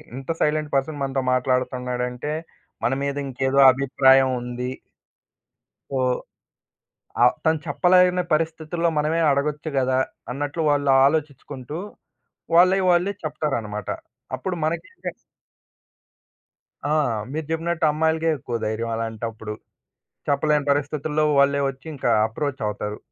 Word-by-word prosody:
ఇంత 135 +2 -9
silent 150 0 +1
person 140 +2 -1
మనతో 135 -1 -1
మాట్లాడుతున్నాడంటే, 125 +1 -1 0.5
మన - - +2
మీద 140 0 -1
ఇంకేదో 135 +1 0
అభిప్రాయం 135 0 +4
ఉంది. 125 +1 -4 1.2
సో, 135 - -1 1.2
ఆహ్, 125 - +6
తను 160 0 +3
చెప్పలేని 180 +4 +4
పరిస్థితుల్లో 160 +2 0
మనమే 155 +3 +1
అడగొచ్చు 150 +2 -1
గదా! 130 0 +2 0.3
అన్నట్లు 145 +5 -3
వాళ్ళు 145 -1 +2 0.2
ఆలోచించుకుంటూ, 145 -1 -3 0.8
వాళ్ళై 185 +3 +6
వాళ్ళే 180 +3 +3
చెప్తారనమాట. 115 -10 -3 0.5
అప్పుడు 175 +8 -4
మనకిచ్చే 170 - -4 1.8
ఆ! - - -1 0.4
మీరు 155 0 -3
చెప్పినట్టు 165 0 0
అమ్మాయిలకే 160 +1 +1
ఎక్కువ 120 -1 -5
ధైర్యం 110 +2 -2
అలాంటప్పుడు. 110 -1 -4 0.8
చెప్పలేని 145 +1 +2
పరిస్థితుల్లో 150 +1 0 0.2
వాళ్ళే 140 0 +4
ఒచ్చి 135 +2 -16
ఇంక 135 - -4 0.2
అప్రోచ్ 135 +4 -4
అవుతారు. 105 0 -4
140 Hz, 105 wpm, -23 LUFS, 130-155 Hz, 1.8 s, ఆహ్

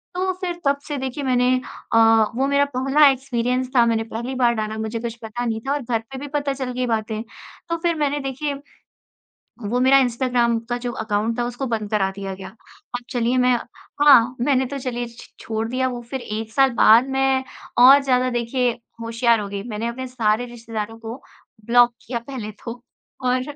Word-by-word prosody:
तो 375 +1 0
फिर 350 -2 -3
तब 280 0 +2
से 295 -2 -3
देखिए 265 +2 -4
मैंने 250 -1 +2 0.5
अ, - - +5 0.4
वो 270 +2 +1
मेरा 280 0 +3
पहला 275 +3 +5
एक्सपीरियंस 255 -1 -1
था 240 -2 +6
मैंने 225 -1 +1
पहली 230 +3 -5
बार 240 -2 +3
डाला, 215 0 -3
मुझे 220 +1 -3
कुछ 235 -1 -5
पता 235 +2 -4
नहीं 225 -1 -2
था 275 - +1
और 290 - -2
घर 235 -2 -1
पे 265 - -6
भी 290 - -6
पता 285 -1 0
चल 260 -2 -4
गई 250 0 -1
बातें। 220 -1 -2 0.5
तो 335 - 0
फिर 340 -1 +2
मैंने 290 -1 0
देखिए, 275 +2 -3 1.1
वो 235 +4 -1
मेरा 265 +2 +6
इंस्टाग्राम 245 -2 +1
का 240 - +1
जो 245 - -2
अकाउंट 220 +1 -2
था 240 - +1
उसको 245 +2 -4
बंद 220 -4 -3
करा 195 -2 +2
दिया 195 -1 -5
गया। 190 0 -8
अब 245 - -11
चलिए 245 -1 0
मैं 250 - +4 0.5
हाँ, 255 -4 +6
मैंने 265 0 +2
तो 280 +2 -5
चलिए 245 -2 -3
छ 235 +1 -14
छोड़ 220 0 -3
दिया 260 +2 0
वो, 245 -1 -5
फिर 260 +3 -6
1 220 -1 -5
साल 270 +3 +4
बाद 235 +3 +6
मैं 270 0 +2 0.4
और 270 +3 +9
ज़्यादा 255 -1 +2
देखिए 245 +1 0 0.3
होशियार 230 0 +2
हो 205 - -5
गई। 200 0 -5
मैंने 220 0 -3
अपने 260 +2 -5
सारे 235 -1 0
रिश्तेदारों 225 -1 -6
को 225 +1 -7 0.5
ब्लॉक 240 0 +5
किया 240 0 -2
पहले 230 -6 -5
तो 240 0 -6 0.4
और 255 0 +2
245 Hz, 195 wpm, -22 LUFS, 225-265 Hz, 1.1 s, और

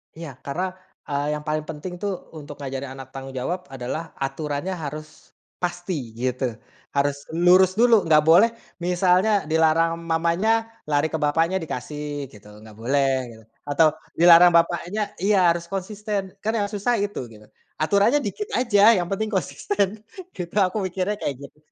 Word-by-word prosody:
Iya. 165 -2 -7 0.2
Karena, 180 +6 -2 0.4
eee, 145 +1 -1
yang, 150 - -7
paling 155 0 -1
penting 160 +3 -6
tuh 205 -1 -2 0.3
untuk 145 -1 -9
ngajarin 135 -1 -5
anak 135 -1 -9
tanggung 135 0 -8
jawab 175 +7 -3
adalah 135 +5 -6
aturannya 145 +5 -3
harus 155 +2 -9 0.3
pasti 175 - -4
gitu. 130 +2 -1 0.5
Harus 140 0 0
lurus 180 +2 +5
dulu. 230 -3 +4
Enggak 155 -2 +5
boleh 195 +8 +7 0.4
misalnya 180 +3 +3 0.2
dilarang 165 +1 +2
mamanya, 170 +6 +1 0.4
lari 145 +1 +2
ke 160 - +1
bapaknya 165 +5 +2
dikasih 145 0 -5
gitu. 105 -1 -16
Enggak 110 -1 -14
boleh 135 +4 +1 0.2
gitu. 110 0 -16 0.3
Atau 155 +2 +5 0.3
dilarang 175 +1 +8
bapaknya 175 +5 +1 0.2
iya, 200 +1 +3
harus 170 0 -3
konsisten 200 +2 -3 0.2
kan 220 - 0
yang 205 -2 0
susah 210 +4 0
itu 205 0 -3
gitu. 105 0 -15 0.3
Aturannya 200 - +3
dikit 420 - -4
aja, 230 -5 +3 0.2
yang 175 - 0
penting 215 +2 -1
konsisten 200 0 -1 0.5
gitu. 175 -2 -7
Aku 195 +2 +2
mikirnya 185 +2 -1
kayak 140 - -2
gitu. 140 - -17
165 Hz, 150 wpm, -23 LUFS, 145-190 Hz, 0.5 s, dilarang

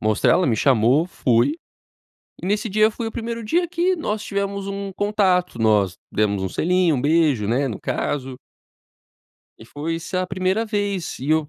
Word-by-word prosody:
mostrar, 110 -1 +2
ela 185 - +2
me 115 - +2
chamou, 130 +5 +3
fui, 130 -2 +1 0.9
e 175 - -6
nesse 210 +3 0
dia 215 +1 +3
foi 230 +1 -5
o - - -5
primeiro 230 0 -5
dia 345 +9 +1
que 360 +2 +1
nós 215 -10 -3
tivemos 200 0 -3
um 200 0 -4
contato, 185 - +1
nós 105 -4 +3 0.2
demos 100 -2 0
um 95 - -2
selinho, 175 - +2
um 125 - -2
beijo, 145 -8 +2
né, 130 +5 +1
no 110 -6 -5
caso. 135 -3 -3 1.2
E - - -13
foi, 155 +7 -4
sa 185 +2 -2
a - - -3
primeira 185 +4 0
vez 205 -4 -2
e 135 +4 -3
eu, 155 -1 +2
180 Hz, 180 wpm, -22 LUFS, 130-205 Hz, 1.2 s, chamou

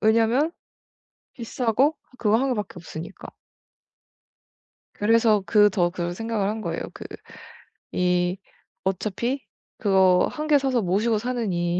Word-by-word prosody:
왜냐면 230 +7 +3 0.8
비싸고 250 +4 0 0.2
그거 215 0 +3
1 265 0 +1
밖에 210 -1 -5
없으니까. 165 -1 -9 1.7
그래서 220 -1 +3
그 210 -1 +5
더 180 -3 +1
그런 175 -1 -4
생각을 225 -1 -2
한 220 +1 -3
거예요. - - -3
그 - - -10 0.9
이 180 0 +1 0.5
어차피 215 +7 -2 0.4
그거 190 -3 +4
1 305 0 -5
개 290 - +6
사서 265 -4 +1
모시고 210 +5 +1
사느니 190 -8 -1
215 Hz, 225 characters per minute, -24 LUFS, 185-235 Hz, 1.7 s, 개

